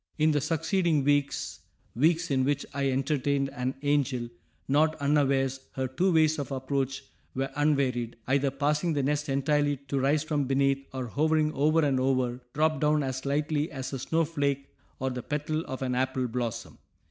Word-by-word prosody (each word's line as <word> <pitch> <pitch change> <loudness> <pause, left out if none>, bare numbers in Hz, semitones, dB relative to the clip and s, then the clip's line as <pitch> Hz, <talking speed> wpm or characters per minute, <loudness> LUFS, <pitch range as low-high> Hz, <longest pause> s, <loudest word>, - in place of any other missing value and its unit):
] - - -40
In 155 - +5
the 145 -1 +1
succeeding 165 0 +1
weeks 145 0 0 0.3
weeks 165 +5 +2
in 130 -1 +2
which 145 +1 0
I 140 -1 0
entertained 135 +1 0
an 130 -1 -2
angel, 140 -4 +1 0.4
not 155 +3 +3
unawares, 140 -2 +1
her 130 0 -2
two 180 +9 +1
ways 155 -2 +3
of 140 -2 -4
approach 135 0 -2 0.3
were 135 +1 -2
unvaried; 135 -5 +1
either 140 +1 +2
passing 150 +5 0
the 140 -2 0
nest 150 +2 0
entirely 145 +1 +1
to 140 - 0
rise 145 +3 +2
from 150 -3 0
beneath, 135 +1 +1
or, 130 -2 -4
hovering 155 +4 +1
over 155 +2 +3
and 135 -2 +2
over, 130 -1 0
drop 155 0 +2
down 150 0 +3
as 130 0 -3
lightly 150 +2 0
as 135 -1 -5
a 135 - -3
snowflake 140 -2 -1 0.2
or 130 0 -2
the 125 0 -4
petal 150 +3 -2
of 130 0 -4
an 125 -1 -1
apple 130 0 0
blossom. 120 -1 -4
140 Hz, 170 wpm, -28 LUFS, 130-150 Hz, 0.4 s, In